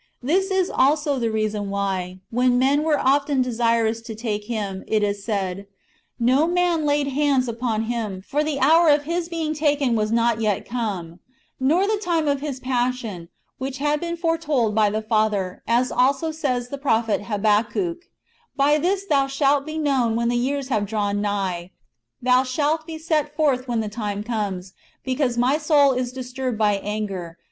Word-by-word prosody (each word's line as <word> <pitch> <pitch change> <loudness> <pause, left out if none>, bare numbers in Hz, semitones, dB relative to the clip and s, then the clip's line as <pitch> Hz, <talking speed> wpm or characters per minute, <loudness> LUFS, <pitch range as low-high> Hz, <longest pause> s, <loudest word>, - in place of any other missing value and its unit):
This 375 +9 +1
is 380 -2 +1
also 285 0 +2
the 230 -1 0
reason 215 -2 -2
why, 190 -2 -3
when 245 +1 +2
men 275 +3 +3
were 310 -1 +2
often 280 0 +2
desirous 230 -2 +1
to 225 -1 -8
take 210 -2 -3
Him, 205 -4 -4
it 215 -1 +1
is 200 -1 -1
said, 200 -2 -3 0.2
" 305 - -41
No 260 +6 +3
man 345 -3 +1
laid 290 -1 +1
hands 275 -2 +1
upon 230 -1 -1
Him, 220 -5 -3
for 295 +2 0
the 300 -2 -2
hour 320 +5 +5
of 290 0 +4
His 335 +2 -2
being 325 -2 -2
taken 290 -5 +1
was 215 -1 0
not 230 -1 +2
yet 210 -3 0
come;"* 195 -8 -4 0.4
nor 315 +9 +3
the 420 0 0
time 335 -6 0
of 280 -1 +1
His 285 -3 -4
passion, 245 -8 -2 0.3
which 265 +1 -4
had 295 +2 0
been 340 +1 -4
foreknown 315 -9 0
by 215 -1 +3
the 215 +1 -2
Father; 215 -4 0
as 240 +2 +2
also 275 +5 +2
says 255 -6 -2
the 280 - -6
prophet 225 -6 +1
Habakkuk, 215 - 0 0.3
" - - -39
By 295 +1 +4
this 380 +5 0
Thou 280 -7 +2
slialt 275 +1 +1
be 310 0 -4
known 265 -7 +1
when 235 0 +1
the 240 - 0
years 270 +2 -1
have 210 -5 0
drawn 205 -1 -1
nigh; 190 -4 -2 0.5
Thou 255 0 +5
shalt 300 +5 -1
be 320 -1 -6
set 310 -2 -1
forth 275 -5 +1
when 235 -2 0
the 215 - -3
time 205 -1 -4
comes; 200 -5 -3 0.3
because 255 -2 0
my 260 +5 +2
soul 295 -3 +4
is 250 -1 -2
disturbed 255 -1 -4
by 210 -2 +2
anger, - - -6
Thou 210 -2 -3
shalt - - -8
1 165 - -14
Eph. - - -33
250 Hz, 190 wpm, -23 LUFS, 215-295 Hz, 0.5 s, hour